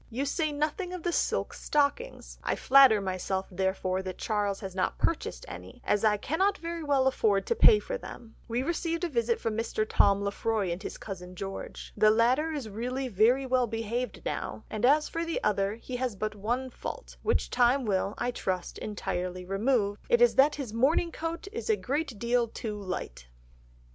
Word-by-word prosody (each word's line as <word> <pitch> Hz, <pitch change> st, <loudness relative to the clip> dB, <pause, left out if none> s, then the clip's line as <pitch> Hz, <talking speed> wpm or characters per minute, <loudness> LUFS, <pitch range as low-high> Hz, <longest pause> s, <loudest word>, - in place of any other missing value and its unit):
You 255 Hz, +4 st, -2 dB
say 310 Hz, +2 st, 0 dB
nothing 305 Hz, +5 st, -2 dB
of 360 Hz, -3 st, -6 dB
the 350 Hz, -, 0 dB
silk -, -, 0 dB
stockings, 300 Hz, +13 st, -1 dB
I -, -, 0 dB
flatter 265 Hz, -5 st, +6 dB
myself 190 Hz, 0 st, -2 dB
therefore 190 Hz, 0 st, -1 dB
that 185 Hz, -1 st, -6 dB
Charles 205 Hz, -2 st, -1 dB
has 190 Hz, -2 st, -6 dB
not 185 Hz, 0 st, -1 dB
purchased 335 Hz, +8 st, -2 dB
any, -, -, -9 dB
as 205 Hz, 0 st, +1 dB
I 210 Hz, -1 st, +4 dB
cannot 380 Hz, -, +1 dB
very 335 Hz, -1 st, -5 dB
well 280 Hz, -3 st, +2 dB
afford 215 Hz, -7 st, +2 dB
to 470 Hz, -, 0 dB
pay 435 Hz, -, +7 dB
for -, -, -4 dB
them.... 230 Hz, -, -10 dB
We 240 Hz, +2 st, -1 dB
received 335 Hz, +2 st, -2 dB
a 350 Hz, -, 0 dB
visit 235 Hz, -4 st, 0 dB
from 225 Hz, -2 st, -2 dB
Mr. 225 Hz, -1 st, -1 dB
Tom 200 Hz, -1 st, +3 dB
Lefroy 200 Hz, -1 st, -1 dB
and 175 Hz, +3 st, -4 dB
his -, -, -6 dB
cousin 185 Hz, -3 st, -8 dB
George. 195 Hz, +1 st, -7 dB
The 215 Hz, -, +5 dB
latter 245 Hz, +8 st, +3 dB
is 285 Hz, -7 st, -4 dB
really 250 Hz, +5 st, -3 dB
very 240 Hz, +6 st, +3 dB
well 255 Hz, -1 st, +2 dB
behaved 230 Hz, +3 st, -3 dB
now, -, -, -4 dB
and 215 Hz, +2 st, 0 dB
as 300 Hz, +3 st, +4 dB
for 330 Hz, -, -3 dB
the 335 Hz, -1 st, -2 dB
other 200 Hz, 0 st, +1 dB
he 250 Hz, +2 st, -6 dB
has 250 Hz, -4 st, -2 dB
but 215 Hz, +2 st, -3 dB
one 240 Hz, +5 st, -2 dB
fault, -, -, -7 dB
which 455 Hz, -, 0 dB
time 250 Hz, +2 st, +3 dB
will, 200 Hz, 0 st, 0 dB
I 245 Hz, -, -1 dB
trust, 185 Hz, -6 st, -3 dB
entirely 180 Hz, -3 st, -4 dB
remove, 205 Hz, +1 st, +1 dB
it 475 Hz, -1 st, +5 dB
is 485 Hz, 0 st, +6 dB
that 280 Hz, +3 st, +5 dB
his 265 Hz, -7 st, -5 dB
morning 290 Hz, +8 st, +2 dB
coat 330 Hz, +4 st, -4 dB
is 460 Hz, +1 st, -5 dB
a 435 Hz, -, +5 dB
great 290 Hz, -, -2 dB
deal 235 Hz, +2 st, +1 dB
too 220 Hz, -1 st, -5 dB
light." 180 Hz, -, -5 dB
235 Hz, 190 wpm, -29 LUFS, 200-290 Hz, -, pay